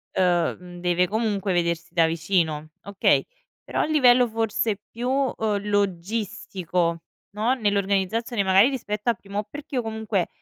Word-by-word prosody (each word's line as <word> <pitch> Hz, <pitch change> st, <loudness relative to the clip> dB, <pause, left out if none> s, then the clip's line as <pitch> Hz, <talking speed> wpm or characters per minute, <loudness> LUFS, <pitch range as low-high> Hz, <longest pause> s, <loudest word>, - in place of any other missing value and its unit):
ehm, 175 Hz, -2 st, +2 dB
mhmm, 175 Hz, -1 st, -11 dB
deve 180 Hz, 0 st, +2 dB
comunque 210 Hz, -3 st, -1 dB
vedersi 170 Hz, -1 st, -1 dB
da 165 Hz, -2 st, +4 dB
vicino, 160 Hz, -2 st, 0 dB
okay, 200 Hz, -1 st, +2 dB, 0.4 s
però -, -, -2 dB
a -, -, +2 dB
livello 255 Hz, -5 st, +5 dB
forse 225 Hz, -2 st, -1 dB
più, 240 Hz, +2 st, -3 dB
uhm, 225 Hz, -7 st, 0 dB
logistico, 190 Hz, -3 st, -1 dB, 0.3 s
no, 220 Hz, +5 st, +1 dB
nell'organizzazione, 205 Hz, +1 st, 0 dB
magari 195 Hz, +6 st, +5 dB
rispetto 215 Hz, -4 st, -3 dB
al 235 Hz, -, +2 dB
primo, 200 Hz, +2 st, -4 dB
perché 290 Hz, -1 st, -8 dB
io 250 Hz, -, +2 dB
comunque 220 Hz, -4 st, -2 dB
200 Hz, 140 wpm, -24 LUFS, 180-225 Hz, 0.4 s, livello